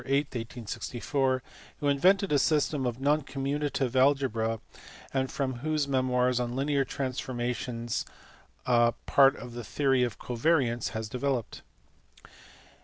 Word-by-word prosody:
8, 140 +2 +1
1864, 125 +3 -2 0.4
who 145 - -1
invented 185 +7 +3
a 145 - +4
system 150 -3 +1
of 120 0 -3
non 145 +3 +2
commuta 140 +2 -2
tive 130 -2 -1
algebra, 130 -5 +2 0.5
and 130 -1 0
from 130 -3 -2
whose 155 +1 0
memoirs 125 -2 +2
on 120 0 -2
linear 140 +1 +1
transformations 125 -3 -3 0.6
part 125 +3 +4
of 120 -1 -9
the 120 0 -6
theory 135 +4 +1
of 120 -5 0
covariants 120 -1 +1
has 110 0 -3
developed. 125 0 -2
130 Hz, 120 wpm, -29 LUFS, 120-140 Hz, 0.6 s, a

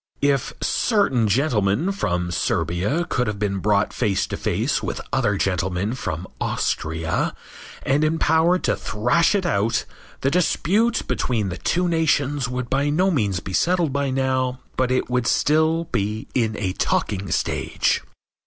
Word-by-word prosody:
If 140 -3 +2
certain 135 - +2
gentlemen 110 - +1
from 90 - -1
Serbia 95 - 0
could 125 -2 0
have 105 -1 -2
been 100 -1 -1
brought 100 +1 +1
face 100 -6 0
to - - -5
face - - -1
with - - -3
other 110 -7 +1
gentlemen 95 +2 -1
from 95 - -4 0.2
Austria 80 +1 -1 0.5
and 140 +3 +2
empowered 160 +3 +2
to - - +2
thrash 125 - +1
it 195 -3 0
out 110 -7 +1 0.4
the 135 - +1
dispute 190 +6 +2
between 110 -6 -1
the 90 - -5
two 180 +1 0
nations 145 -5 +1
would 125 -1 -3
by 140 +3 +1
no 180 +6 +2
means 100 - 0
be 95 - -7
settled 170 - +2
by 140 -1 0
now, 130 -1 0 0.2
but 130 -1 +1
it 130 0 +1
would 125 -2 0
still 160 +2 +2
be 105 +2 -2
in 110 -4 0
a 95 -4 -2
talking 100 0 -1
stage. - - 0
125 Hz, 150 wpm, -22 LUFS, 100-155 Hz, 0.5 s, If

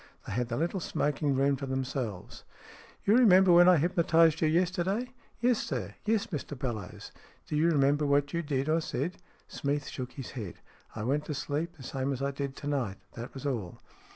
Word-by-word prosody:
They - - -5
had 125 0 0
the 120 0 -3
little 170 +5 -1
smoking 145 -3 0
room 140 +1 +3
to 140 - -5
themselves. 130 -6 -4 0.6
"You 205 - +5
remember 190 -7 +7
when 175 +1 +8
I 180 - +6
hypnotized 165 0 +3
you 160 - +4
yesterday? 185 +8 0
" - - -32
" - - -34
Yes, 245 -1 +3
sir. 105 -8 -4
Yes, 215 -1 +2
Mr 145 -4 -5
Bellowes." 110 -8 -5 0.2
" - - -31
Do - - -3
you 160 +3 +3
remember 145 -1 +3
what 145 0 +2
you 170 - 0
did, 140 -3 -1
or 160 +1 +2
said? 155 +3 -3 0.2
" - - -34
Smeath 145 0 -1
shook 125 -1 -6
his 135 - -7
head. 105 -9 -6 0.2
" - - -27
I 110 - -4
went 145 +6 0
to 150 - -4
sleep, 150 +4 -3
the 135 - -11
same 135 +1 -2
as 135 +1 -4
I 140 - 0
did 140 0 -4
to 145 - -7
night. 125 -9 -1 0.2
That 120 +3 -8
was 135 - -7
all." 115 -11 -3
145 Hz, 215 wpm, -30 LUFS, 130-170 Hz, 0.6 s, when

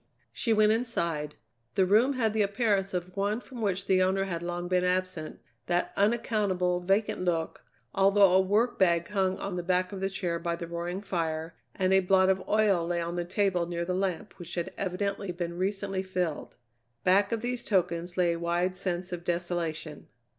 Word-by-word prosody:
She 230 - -1
went 215 -1 +5
inside. 170 -11 -1 0.4
The 190 - +4
room 220 +8 +4
had 225 -5 +1
the 220 - +1
appearance 200 -2 +1
of 180 0 -4
one 205 +3 0
from 250 -1 -10
which 195 -2 0
the 185 -1 +3
owner 190 +1 +2
had 175 -4 -3
long 175 0 -3
been 180 0 +2
absent, 180 -3 -1 0.3
that 175 0 0
unaccountable, 200 -5 +1
vacant 195 +2 +1
look, 170 -3 -1 0.3
although 195 -1 +5
a 190 - +6
work 210 +6 +1
bag 170 -2 +3
hung 190 -2 0
on 195 -2 -4
the - - -1
back 185 +1 0
of 195 -1 -6
a 195 - 0
chair 175 -3 -2
by 170 0 -2
the 170 - -6
roaring 170 +3 -4
fire, 165 -4 -3 0.2
and 185 0 +2
a 190 - +6
blot 190 0 +4
of 190 0 +2
oil 205 -5 +3
lay 175 0 0
on 170 +1 -3
the 175 - -1
table 185 -2 0
near 170 0 -3
the 180 - -1
lamp 185 -2 -2
which 175 -1 -7
had 170 -1 -3
evidently 195 0 -2
been 170 -1 -4
recently 195 +1 -1
filled. 180 -5 -3 0.5
Back 195 +4 +4
of 230 -1 -1
these 245 0 -3
tokens 175 -3 0
lay 175 -2 +3
a 170 - -3
wide 175 +2 0
sense 180 -1 -3
of 175 -1 -5
desolation. 170 -3 -3
185 Hz, 190 wpm, -28 LUFS, 175-200 Hz, 0.5 s, a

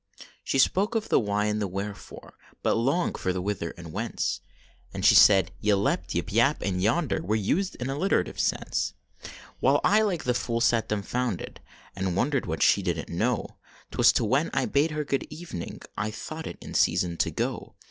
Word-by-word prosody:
She - - -1
spoke 195 - +2
of 220 -1 -1
the - - +4
why 105 -1 0
and 105 0 -1
the 100 - 0
wherefore, 100 +2 -7 0.3
But - - +3
longed 135 +10 0
for 95 - 0
the 90 - -2
whither 90 -3 -2
and 85 -3 -9
whence; - - -2 0.5
And - - -3
she - - +8
said 95 -2 +6
yclept, 100 -5 +1
yip, 85 +3 -2
yap 120 +7 +3
and 90 -2 -1
yonder 125 - +1
Were 105 +5 -1
used 160 - 0
in 125 - -5
alliterative 150 +9 0
sense. - - -1 0.7
Well - - +4
I 215 +1 +4
like 195 -6 -1
a 125 - +2
fool 115 -1 -1
sat 115 -1 +2
dumfounded, 105 0 -3 0.4
And 95 -2 -2
wondered 135 +6 0
what 80 -1 -1
she 100 - +4
didn 85 -3 -2
t - - -10
know. 110 +6 -1 0.3
Twas - - +5
10 110 - 0
when 135 +8 +2
I 135 -2 +2
bade 145 +3 +2
her 150 -1 -2
good 140 -1 -2
evening, 150 - -7
I 105 +1 -2
thought 155 +8 -7
it - - -7
in - - -9
season 85 -1 +2
to - - +1
go. - - -4
110 Hz, 190 wpm, -27 LUFS, 95-140 Hz, 0.7 s, she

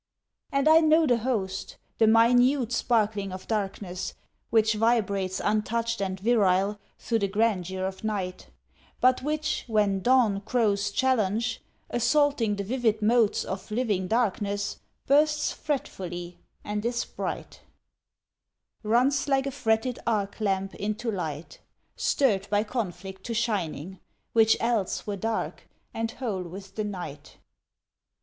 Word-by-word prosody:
And 275 +1 +1
I 315 +1 +8
know 315 0 +4
the 245 -5 +3
host, 205 -6 -3 0.2
the 220 - +5
minute 245 +3 +4
sparkling 215 -4 +1
of 185 0 -8
darkness 195 -4 -3 0.3
Which 220 -1 +3
vibrates 200 -4 +1
untouched 225 +1 0
and 190 -1 -2
virile 205 -2 +2 0.2
through 230 -1 -1
the 200 - +1
grandeur 190 -3 0
of 190 +2 -5
night, 195 -4 -3 0.5
But 255 0 +4
which, 300 +2 -1
when 205 -3 +2
dawn 235 -4 +3
crows 205 -3 +1
challenge, 230 -1 0 0.3
assaulting 240 -2 +2
the 200 - -3
vivid 220 -1 0
motes 225 -1 +3
Of 190 +1 -6
living 210 -5 0
darkness, 205 -2 -1 0.3
bursts 300 +2 +3
fretfully, 180 - -4 0.2
and 210 0 -3
is 235 +1 -1
bright: - - -6 1.2
Runs 250 +7 +2
like 270 -1 +2
a 275 - -2
fretted 245 -1 0
arc 205 -3 -1
lamp 195 -2 0
into 215 +3 -3
light, 160 -5 -5 0.4
Stirred 205 -8 +1
by 205 +1 +2
conflict 190 -4 -5
to 230 - -3
shining, 190 -6 -2 0.3
which 225 -1 +5
else 230 -5 0
Were 205 - -3
dark 220 +3 -3 0.2
and 225 0 -2
whole 225 -6 -3
with 190 +3 -9
the 215 - -2
night. 175 -8 -7
215 Hz, 130 wpm, -27 LUFS, 195-240 Hz, 1.2 s, I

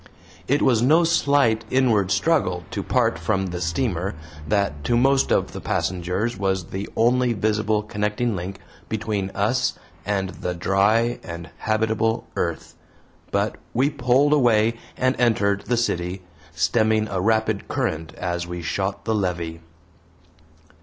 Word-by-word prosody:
It 140 +2 +2
was 120 -4 +4
no 155 +7 +5
slight 140 -8 +3
inward 115 -8 +2
struggle 100 - +1
to - - -2
part - - +1
from 95 0 0
the 90 -1 -4
steamer 90 +1 -1 0.3
that 90 -6 0
to 120 - +2
most 135 +2 +3
of - - +2
the - - -7
passengers 90 +5 -1
was 95 -3 -1
the 95 +2 -4
only 120 +1 +3
visible 110 0 0
connecting 105 +2 -1
link 90 +2 -5 0.3
between 105 -3 -2
us - - +1 0.3
and 100 -2 -1
the 90 -1 -4
dry 105 +7 +2
and 85 0 -8
habitable 110 +1 0
earth, 85 -2 -3 0.6
but - - -1 0.2
we 135 +5 +3
pulled 140 +2 +3
away 115 -5 +4 0.2
and 130 +1 +2
entered 100 -4 +2
the 120 - +1
city, 90 -5 -1 0.3
stemming 110 +6 +2
a 95 -2 -1
rapid 110 0 +1
current 80 +1 -2
as 85 -1 -3
we 90 -1 -6
shot 95 +5 -2
the 110 - +1
levee. 85 -5 -2
105 Hz, 140 wpm, -23 LUFS, 90-120 Hz, 0.6 s, no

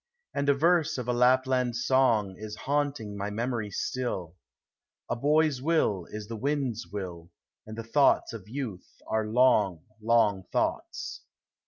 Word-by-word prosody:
And 140 0 0
a 140 - +5
verse 155 0 +2
of 125 -2 -4
a 125 - +1
Lapland 125 0 +3
song 120 -5 +2
Is 105 +2 -7
haunting 140 -7 -1
my 100 +1 -3
memory 115 0 -2
still: 95 -6 -3 0.7
"A - - -1
boy's 150 +1 +2
will 130 - +1
is 105 -1 -7
the 115 - -5
wind's 130 -4 -2
will, 90 -3 -6 0.4
And 110 0 -8
the 115 - -4
thoughts 135 +1 +3
of 105 -3 -9
youth 120 -8 -6
are 110 -1 -1
long, 105 -8 +3 0.2
long 105 -4 +2
thoughts." - - -2
120 Hz, 145 wpm, -28 LUFS, 105-135 Hz, 0.7 s, a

